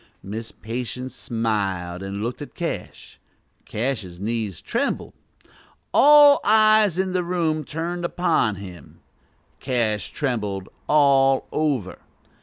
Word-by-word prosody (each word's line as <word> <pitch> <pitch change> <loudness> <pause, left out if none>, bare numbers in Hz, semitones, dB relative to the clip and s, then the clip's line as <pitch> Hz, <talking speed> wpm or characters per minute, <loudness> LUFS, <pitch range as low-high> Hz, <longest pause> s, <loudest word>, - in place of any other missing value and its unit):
Miss 110 +3 -6
Patience 125 +2 -6
smiled, 100 -8 -2
and 100 +1 -5
looked 120 +2 -4
at - - -9
Cash. - - -6 0.5
Cash's 105 -7 -3
knees 110 -3 -3
trembled. - - -2 0.8
All 290 0 +7
eyes 215 -3 +4
in 190 0 0
the 180 -1 0
room 165 -3 -1
turned 170 +4 -4
upon 170 - +1
him. 90 -5 -11 0.6
Cash 115 -5 -1
trembled 105 -9 -3 0.2
all 135 -2 +4
over. 140 -11 -1
125 Hz, 105 wpm, -23 LUFS, 105-165 Hz, 0.8 s, All